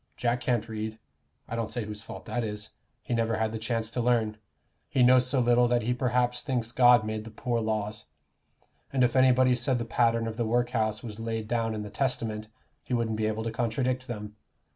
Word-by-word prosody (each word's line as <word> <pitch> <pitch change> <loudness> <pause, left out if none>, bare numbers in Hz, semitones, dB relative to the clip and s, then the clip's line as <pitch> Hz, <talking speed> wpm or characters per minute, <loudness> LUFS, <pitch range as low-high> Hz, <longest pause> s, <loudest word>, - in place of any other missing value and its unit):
Jack 120 0 0
can't 120 -3 0
read 110 0 -4 0.5
I - - -4
don't 115 -1 -2
say 115 -1 -3
whose 105 0 -6
fault - - -9
that 120 - -2
is 105 0 -5 0.3
he - - -3
never 115 -1 +1
had 110 0 0
the 110 - -4
chance 115 0 -2
to 120 - -1
learn; 115 -3 +1 0.5
he 130 - +3
knows 125 0 +6
so 130 +1 +2
little 120 0 +4
that 120 -1 +1
he 120 +3 +1
perhaps 125 0 +1
thinks 125 -5 -2
God 125 -2 +6
made 110 0 -3
the 115 - -9
poor 115 +2 -2
laws, 110 -2 -2 0.8
and 130 -2 +2
if 120 0 +2
anybody 130 -1 +5
said 125 +1 +1
the 120 - -3
pattern 115 0 +2
of 110 -1 -4
the 115 - 0
work 120 +2 +1
house 110 -2 0
was 110 -2 -7
laid 115 -1 -3
down 115 -1 0
in 105 - -4
the 105 - -8
Testament, 110 -3 -1 0.3
he 125 - -2
wouldn't 115 -2 0
be 110 0 0
able 110 +1 -2
to 115 - -2
contradict 125 +2 -1
them. 105 -3 -6
115 Hz, 215 wpm, -28 LUFS, 110-125 Hz, 0.8 s, knows